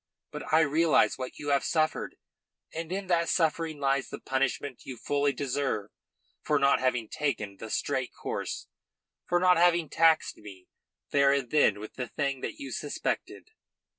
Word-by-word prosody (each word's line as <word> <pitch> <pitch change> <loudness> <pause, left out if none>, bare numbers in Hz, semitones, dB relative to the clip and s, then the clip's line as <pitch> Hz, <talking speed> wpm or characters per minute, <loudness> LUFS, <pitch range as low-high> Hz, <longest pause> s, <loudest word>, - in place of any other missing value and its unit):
But - - -7
I 160 +1 +6
realise 160 -1 +3
what 130 -1 -6
you 145 - -5
have 140 -1 +3
suffered, 155 -1 0 0.6
and 165 +1 -5
in 195 +1 -2
that 170 -2 +1
suffering 160 -2 0
lies 135 -1 0
the - - -7
punishment 135 0 -2
you 130 - -8
fully 145 +3 +1
deserve 135 -7 -2 0.5
for 150 - +1
not 140 0 +4
having 125 -3 0
taken 110 -10 -3
the 110 - -8
straight - - -1
course, - - -5 0.6
for 175 - +2
not 180 -1 +5
having 170 -2 +3
taxed 165 -1 +3
me 95 -3 -12 0.5
there 140 -1 +5
and 140 -4 0
then 110 -9 +4
with 110 - -8
the 125 -1 -3
thing 140 -1 -2
that - - -4
you 280 - -7
suspected." - - -4
145 Hz, 165 wpm, -28 LUFS, 130-160 Hz, 0.6 s, I